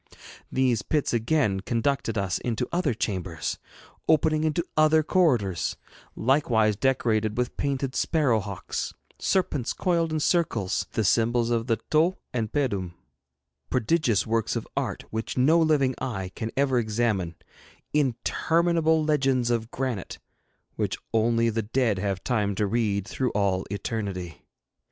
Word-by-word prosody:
These 125 Hz, -5 st, +2 dB
pits 150 Hz, +6 st, 0 dB
again 115 Hz, -3 st, +1 dB
conducted 115 Hz, +2 st, -1 dB
us 95 Hz, -2 st, 0 dB
into 120 Hz, -2 st, -2 dB
other 170 Hz, -8 st, 0 dB
chambers, 90 Hz, -6 st, -3 dB, 0.5 s
opening 155 Hz, 0 st, +3 dB
into 160 Hz, +2 st, 0 dB
other 155 Hz, 0 st, +4 dB
corridors, 125 Hz, -, +1 dB, 0.4 s
likewise 115 Hz, -5 st, +2 dB
decorated 110 Hz, -3 st, +1 dB
with 125 Hz, 0 st, -1 dB
painted 135 Hz, -1 st, -1 dB
sparrow 145 Hz, -9 st, +2 dB
hawks, 100 Hz, -2 st, -5 dB, 0.2 s
serpents 150 Hz, -10 st, 0 dB
coiled 170 Hz, -3 st, 0 dB
in 155 Hz, -, 0 dB
circles, 150 Hz, -, 0 dB
the 110 Hz, -, +1 dB
symbols 115 Hz, +3 st, +2 dB
of 115 Hz, 0 st, 0 dB
the 115 Hz, -, +3 dB, 0.2 s
tau 165 Hz, +5 st, +3 dB, 0.2 s
and 115 Hz, -3 st, -2 dB
pedum 100 Hz, -, -1 dB, 0.7 s
prodigious 125 Hz, -, +1 dB
works 115 Hz, 0 st, 0 dB
of -, -, -3 dB
art -, -, -2 dB
which 110 Hz, +3 st, -4 dB
no 150 Hz, +7 st, +5 dB
living 150 Hz, -5 st, +3 dB
eye 100 Hz, -8 st, -3 dB
can 110 Hz, -, -4 dB
ever 135 Hz, -3 st, +3 dB
examine 105 Hz, -6 st, 0 dB, 0.6 s
interminable 160 Hz, +4 st, +2 dB
legends 135 Hz, -5 st, +2 dB
of 115 Hz, -1 st, -1 dB
granite 125 Hz, -8 st, -3 dB, 0.6 s
which -, -, -1 dB, 0.2 s
only 115 Hz, +1 st, +2 dB
the 115 Hz, +1 st, -1 dB
dead 110 Hz, -2 st, 0 dB
have 95 Hz, -1 st, -2 dB
time 105 Hz, -5 st, 0 dB
to 105 Hz, -, +1 dB
read 100 Hz, -2 st, 0 dB
through 130 Hz, -2 st, -1 dB
all 100 Hz, -2 st, 0 dB
eternity. 100 Hz, -4 st, -4 dB
120 Hz, 130 wpm, -26 LUFS, 105-145 Hz, 0.7 s, no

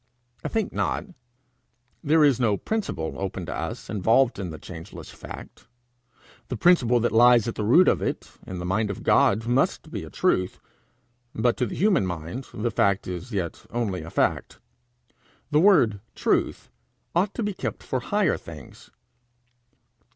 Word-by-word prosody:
I -, -, -2 dB
think 220 Hz, -3 st, -2 dB
not. -, -, -1 dB, 1.0 s
There 155 Hz, +2 st, +4 dB
is 140 Hz, -5 st, +4 dB
no 110 Hz, -5 st, +2 dB
principle, 195 Hz, -, -3 dB
open 95 Hz, -2 st, -4 dB
to -, -, -5 dB
us, -, -, -5 dB
involved 115 Hz, +6 st, +2 dB
in 95 Hz, -3 st, -4 dB
the 80 Hz, -, -7 dB
changeless 80 Hz, -1 st, -10 dB
fact. -, -, -11 dB, 0.8 s
The 125 Hz, -, -4 dB
principle 125 Hz, -5 st, +4 dB
that 120 Hz, -, +1 dB
lies 120 Hz, 0 st, +6 dB
at 115 Hz, -, -2 dB
the 105 Hz, -, -4 dB
root 130 Hz, -, +5 dB
of -, -, +3 dB
it -, -, -3 dB, 0.2 s
in 95 Hz, -, -5 dB
the 90 Hz, -, -5 dB
mind 105 Hz, +4 st, 0 dB
of 100 Hz, -, -6 dB
God 110 Hz, +3 st, +3 dB
must 125 Hz, +3 st, 0 dB
be -, -, -4 dB
a -, -, -9 dB
truth, 90 Hz, 0 st, 0 dB, 0.8 s
but 120 Hz, -1 st, +2 dB
to 125 Hz, -, 0 dB
the -, -, -6 dB
human 185 Hz, -, +2 dB
mind 85 Hz, +9 st, -5 dB
the 115 Hz, +3 st, -2 dB
fact 100 Hz, -2 st, +1 dB
is 90 Hz, +1 st, -5 dB
as 125 Hz, -, -15 dB
yet 95 Hz, -5 st, -4 dB
only 105 Hz, -7 st, -2 dB
a 80 Hz, -, -8 dB
fact. -, -, -1 dB, 0.9 s
The 150 Hz, -, +4 dB
word 155 Hz, -, +4 dB, 0.2 s
truth -, -, 0 dB, 0.4 s
ought 190 Hz, +4 st, +1 dB
to 235 Hz, -, -2 dB
be 205 Hz, -1 st, -1 dB
kept -, -, -5 dB
for 130 Hz, -, -2 dB
higher 205 Hz, +7 st, +1 dB
things. 75 Hz, -5 st, -12 dB
115 Hz, 165 wpm, -25 LUFS, 95-140 Hz, 1.0 s, lies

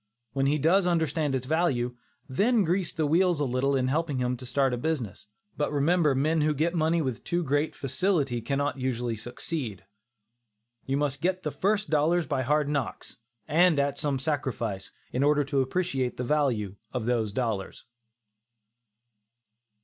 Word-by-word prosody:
When 135 Hz, 0 st, +1 dB
he 145 Hz, +2 st, +2 dB
does 175 Hz, +6 st, +3 dB
understand 160 Hz, -4 st, +1 dB
its 130 Hz, -1 st, -2 dB
value, 130 Hz, -6 st, 0 dB, 0.3 s
then 210 Hz, -, +2 dB
grease 180 Hz, +1 st, 0 dB
the 160 Hz, -, -1 dB
wheels 170 Hz, +2 st, +3 dB
a 145 Hz, -, +1 dB
little 130 Hz, +2 st, +1 dB
in 130 Hz, -1 st, +1 dB
helping 150 Hz, 0 st, 0 dB
him 125 Hz, 0 st, 0 dB
to 130 Hz, +1 st, -9 dB
start 130 Hz, -1 st, +1 dB
business, 120 Hz, -11 st, -3 dB, 0.3 s
but 150 Hz, -, -1 dB
remember 150 Hz, 0 st, +3 dB
men 155 Hz, +4 st, +2 dB
who 150 Hz, 0 st, +2 dB
get 165 Hz, +4 st, +1 dB
money 165 Hz, 0 st, +2 dB
with 130 Hz, -4 st, -3 dB
too 175 Hz, 0 st, -1 dB
great 145 Hz, +1 st, 0 dB
facility 135 Hz, -2 st, 0 dB
cannot 140 Hz, +3 st, -1 dB
usually 120 Hz, -2 st, -1 dB
succeed. 120 Hz, -, -5 dB, 1.0 s
You 135 Hz, +1 st, +1 dB
must 140 Hz, -2 st, -1 dB
get 185 Hz, +1 st, 0 dB
the 150 Hz, -, -2 dB
first 210 Hz, +3 st, 0 dB
dollars 160 Hz, +3 st, +3 dB
by 140 Hz, -4 st, -1 dB
hard 150 Hz, +3 st, +1 dB
knocks, 145 Hz, -4 st, -3 dB, 0.3 s
and 165 Hz, +1 st, +4 dB
at 140 Hz, 0 st, 0 dB
some 145 Hz, -3 st, 0 dB
sacrifice, 130 Hz, -8 st, -3 dB, 0.2 s
in 125 Hz, -, 0 dB
order 145 Hz, +1 st, +4 dB
to 140 Hz, -1 st, 0 dB
appreciate 130 Hz, -3 st, -1 dB
the 125 Hz, -, -2 dB
value 120 Hz, -8 st, 0 dB
of 125 Hz, -4 st, -3 dB
those 115 Hz, -3 st, 0 dB
dollars. 110 Hz, -4 st, -3 dB
145 Hz, 160 wpm, -27 LUFS, 125-160 Hz, 1.0 s, and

